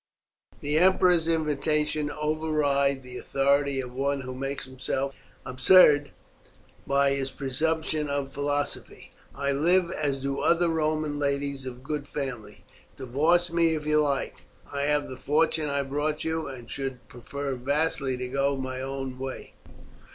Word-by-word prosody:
"The 150 +2 +1
emperor's 180 -2 +4
invitations 150 -1 0
override 150 -3 +1
the 125 0 -8
authority 140 0 +1
of 125 -2 -5
one 140 +1 -1
who 130 -1 -6
makes 135 +2 -4
himself 130 +1 -3 0.3
absurd 145 +1 +6 0.8
by 140 0 +3
his 135 -1 -1
presumption 155 +3 -1
of 140 -1 -2
philosophy. 145 0 -3 0.2
I 140 0 -1
live 170 +5 +3
as 145 -4 -1
do 140 +1 -3
other 170 0 +3
Roman 155 -2 0
ladies 140 -1 -1
of 125 0 -8
good 145 0 -3
family. 135 -7 -6 0.3
Divorce 155 +7 +2
me 165 -1 +3
if 150 -1 -5
you 150 0 +3
like; 140 -2 -1 0.4
I 140 0 -1
have 150 0 +1
the 130 - -8
fortune 155 +1 +1
I 140 0 0
brought 145 +3 -2
you, 160 -1 -2
and 125 -4 -8
should 135 0 -5
prefer 140 +3 -5
vastly 135 0 0
to 125 0 -4
go 140 +2 +1
my 130 -1 -4
own 135 -1 -5
way." 135 0 -6
140 Hz, 145 wpm, -27 LUFS, 135-155 Hz, 0.8 s, absurd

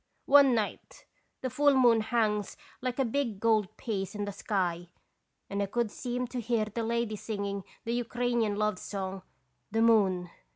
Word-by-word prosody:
One 275 -3 +7
night 215 -2 -4 0.4
the 260 - -2
full 285 +2 +4
moon 240 -4 +5
hangs 215 -2 0 0.2
like 255 -1 -2
a 270 - +2
big 235 -4 -1
gold 215 -3 +1
piece 200 -3 -3
in 205 0 -2
the 205 - -4
sky, 180 -4 -2 0.6
and 200 0 -2
I 200 - 0
could 235 +1 -1
seem 245 +1 -3
to 250 -1 -3
hear 225 -1 +1
the 215 +2 -4
lady 230 -1 -1
singing 200 -2 -4 0.2
the 230 - -1
Ukrainian 240 -2 0
love 210 -2 0
song, 190 -1 -5 0.3
* - - -47
The 225 +1 +2
Moon.' 190 -6 +3
220 Hz, 170 wpm, -30 LUFS, 200-240 Hz, 0.6 s, One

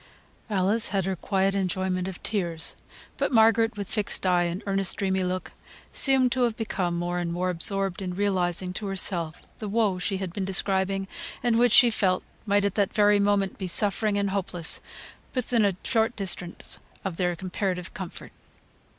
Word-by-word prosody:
Alice 205 +2 +1
had 195 -3 0
her 190 0 -1
quiet 195 +2 0
enjoyment 185 -1 -1
of 190 -2 -7
tears. 170 -6 -1 0.4
But - - 0
Margaret, 225 -1 +4
with 200 -2 -4
fixed 210 -3 -1
eye, 180 -1 +3
and 175 +5 -3
earnest, 195 -2 +1
dreamy 190 -1 0
look, 185 0 -3 0.4
seemed 265 -2 +4
to 250 -2 +2
become 190 -6 -2
more 175 +1 -2
and 170 -1 -2
more 180 +2 -1
absorbed 195 +2 +1
in 180 -2 -4
realising 185 -2 0
to 205 +2 -4
herself 175 -4 0
the 215 - -4
woe 205 -3 +1
she 195 +2 -1
had 190 -3 -5
been 200 - -3
describing, 195 0 0 0.4
and 235 -2 +3
which 240 -2 +4
she 245 -1 +8
felt 185 -4 +1 0.2
might 200 0 +3
at 200 - 0
that 200 -2 +1
very 205 -1 +5
moment 200 -1 +1
be 190 - -3
suffering 205 +3 +2
and 200 -1 0
hopeless 180 -4 +1 0.5
within 245 -2 +1
a 200 -3 +2
short 230 -1 +1
distance 180 -3 -2 0.3
of 185 -4 -3
their 180 -2 0
comparative 185 0 -3
comfort. 185 -4 -8
195 Hz, 170 wpm, -26 LUFS, 180-210 Hz, 0.5 s, she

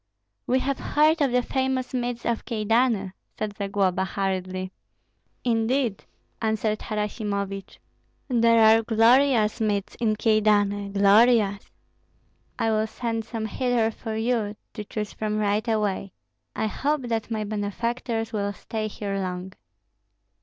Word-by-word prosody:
"We 255 - +3
have 275 0 -2
heard 310 +2 +3
of 275 -3 +3
the 250 0 +2
famous 260 -1 -1
meads 245 -1 -2
of 235 -1 -1
Kyedani," 225 -2 +1 0.3
said 210 -1 -3
Zagloba, 195 -2 0
hurriedly. 185 -1 -3 0.7
"Indeed!" 235 -1 0 0.4
answered 220 -1 0
Harasimovich, 200 -2 -3 0.5
"there 230 -2 +4
are 220 +1 +6
glorious 230 0 +3
meads 205 -2 0
in 220 -3 +1
Kyedani, 205 -2 +2
glorious. 205 0 +4 0.9
I 225 - +1
will 215 0 +1
send 225 0 -3
some 225 -1 -4
hither 235 0 0
for 220 0 -6
you 220 -2 0 0.2
to 210 - -5
choose 210 0 -5
from 215 -1 -2
right 210 +2 0
away. 205 -3 -1 0.4
I - - -1
hope 280 +6 -1
that 230 -2 -2
my 220 -2 -2
benefactors 225 +2 -3
will 205 -1 -1
stay 215 +2 -4
here 200 -1 -4
long." 185 0 -4
220 Hz, 125 wpm, -25 LUFS, 205-235 Hz, 0.9 s, are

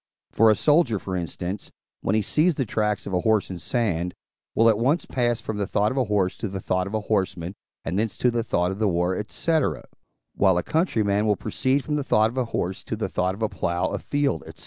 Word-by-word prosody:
For 115 0 +5
a 110 - +5
soldier, 145 -6 +3
for 95 -1 -5
instance, 90 +2 -4 0.3
when 100 - 0
he 110 - +2
sees 160 - +2
the 135 - -1
tracks 105 -1 -1
of 100 - -5
a 90 - +2
horse 110 0 +1
in 90 - -6
sand, 90 -6 -1 0.4
will 115 - +5
at 110 -2 +4
once 140 +8 +2
pass 120 -2 0
from 110 - -4
the 100 -1 -1
thought 105 +1 +1
of 130 - -4
a 130 - +2
horse 100 -3 +1
to - - -2
the 95 0 -5
thought 90 0 -1
of 105 - -4
a 110 - 0
horseman, 95 -4 -1 0.3
and 90 +4 -1
thence 110 0 -1
to 125 - +2
the 120 0 0
thought 90 -5 0
of 95 +3 -6
war, 90 -1 +1
&c. 165 +6 +1 0.7
while 95 -3 +3
a 90 - 0
countryman 110 - +1
will 105 - +3
proceed 130 +7 0
from 150 -1 -1
the 145 - -1
thought 110 -4 +3
of 125 - -10
a 125 - +1
horse 95 -4 -3
to - - -3
the - - -3
thought 90 +1 0
of 110 - -5
a 110 - +1
plough, 85 +1 -1
a - - -3
field, 145 - -1
&c. - - -9
105 Hz, 240 wpm, -24 LUFS, 95-120 Hz, 0.7 s, For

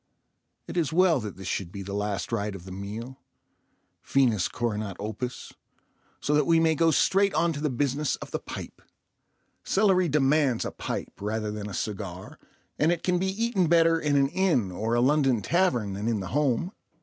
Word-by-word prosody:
It - - -7
is 160 -6 +1
well 170 -3 +4
that 105 -5 -6
this 95 -1 -8
should 95 -3 -3
be 100 0 -6
the 100 +1 -6
last 105 0 -2
rite 105 -3 -2
of 90 -2 -10
the 95 - -9
meal—finis 110 +1 -3
coronat 105 -5 -3
opus—so 120 +6 -7
that 150 - +3
we 165 -1 +5
may 165 -1 +3
go 165 +1 +3
straight 195 +3 +3
on 165 +2 +2
to 145 - -5
the 150 - +1
business 140 +3 0
of - - -10
the - - -2
pipe. - - -8 0.8
Celery 190 -3 +3
demands 140 -3 +2
a - - -3
pipe - - -5
rather 105 +1 -2
than 105 -1 -5
a 95 - -6
cigar, 95 -3 -5 0.4
and 155 +3 +4
it 175 - -2
can 180 -1 +1
be 190 - 0
eaten 195 -2 0
better 165 0 +4
in 150 -2 0
an 135 -1 +3
inn 170 - +1
or 110 +6 -1
a 120 - +3
London 135 -4 +3
tavern 125 - +1
than 100 +3 -3
in 115 -3 +1
the 95 -2 -5
home. 145 +4 0
130 Hz, 185 wpm, -27 LUFS, 105-165 Hz, 0.8 s, we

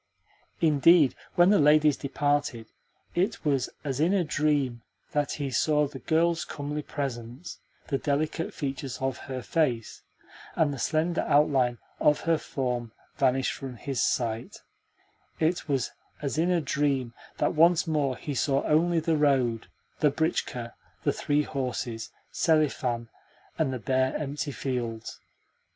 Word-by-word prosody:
Indeed, 155 -1 +5 0.2
when 175 +2 +6
the 210 - +5
ladies 150 0 +5
departed, 145 -4 -1 0.5
it 185 0 -1
was 140 -4 +1
as 135 -3 -2
in 170 +6 +3
a 190 - +2
dream 145 -6 0 0.3
that 145 -1 0
he 140 -2 -3
saw 150 +3 +2
the 135 -1 -9
girl's 165 +1 +1
comely 150 +1 -4
presence, 130 0 -5 0.3
the 135 - 0
delicate 155 +3 -1
features 135 -2 -4
of 130 -2 -2
her 130 -2 -4
face, 125 -9 -1 0.5
and 150 -3 +2
the 135 - -6
slender 160 +6 +1
outline 135 -4 +3 0.2
of 150 -1 +3
her 165 -1 +2
form 125 -3 -3 0.3
vanish 135 -1 +2
from 130 -2 -7
his 135 0 -2
sight; 115 -1 -1 0.8
it 160 0 0
was 135 -4 0 0.3
as 145 +1 -2
in 170 +2 +2
a 175 -2 +2
dream 140 -4 0 0.2
that - - +1
once 170 +2 +5
more 145 -5 0
he 145 - -5
saw 135 0 +1
only 165 +2 +3
the 160 0 +1
road, 130 -6 +2 0.3
the 150 - +4
britchka, 130 -6 -2 0.3
the - - +2
three 145 +1 +1
horses, 125 -5 -3 0.2
Selifan, 135 -7 +1 0.5
and 155 -4 +2
the 130 - -2
bare, 130 +2 +1
empty 145 0 -3
fields. 120 -5 -4
145 Hz, 140 wpm, -27 LUFS, 130-155 Hz, 0.8 s, when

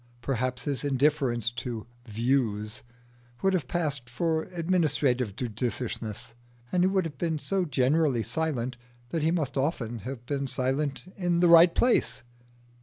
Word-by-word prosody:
Perhaps 130 -1 -1
his 145 -2 -2
indifference 135 -4 +1
to 120 -2 -5 0.2
"views" 110 -2 0 0.6
would 195 0 +3
have 165 -9 0
passed 145 -7 -2
for 160 +6 0
administrative 150 - +1
judiciousness, 115 -1 -4 0.4
and 180 - +2
he - - +5
would 190 -2 +1
have 145 -4 -7
been 165 -2 0
so 190 +4 -1
generally 135 -2 +2
silent 130 -6 -2 0.3
that 165 - -1
he 155 - +2
must 155 -6 -1
often 120 -5 -1
have 120 +3 -7
been 140 +1 -2
silent 135 +2 -1
in 175 -2 +1
the 175 - +5
right 170 0 +8
place. 245 - +2
135 Hz, 140 wpm, -28 LUFS, 120-165 Hz, 0.6 s, right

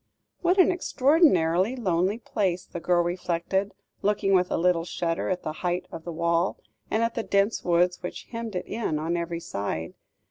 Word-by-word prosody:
"What 360 +2 +3
an 370 - +6
extraordinarily 255 - +3
lonely 190 -3 +1
place," 190 -6 -1
the 175 - -7
girl 175 0 +2
reflected, 180 +3 -1 0.3
looking 200 -1 +1
with 180 -1 +3
a - - 0
little 175 -1 +2
shudder 165 -1 -2
at 180 -1 -2
the 155 - -3
height 180 0 -1
of 160 - -8
the 175 - -4
wall, 170 +2 +1 0.3
and 220 - +1
at 230 0 0
the 230 - -1
dense 200 0 +1
woods 180 +1 +2
which 180 - -6
hemmed 230 -3 -5
it 180 - -2
in 210 -9 -2
on 160 +3 -1
every 170 0 -2
side. 100 - -4
180 Hz, 180 wpm, -26 LUFS, 170-210 Hz, 0.3 s, an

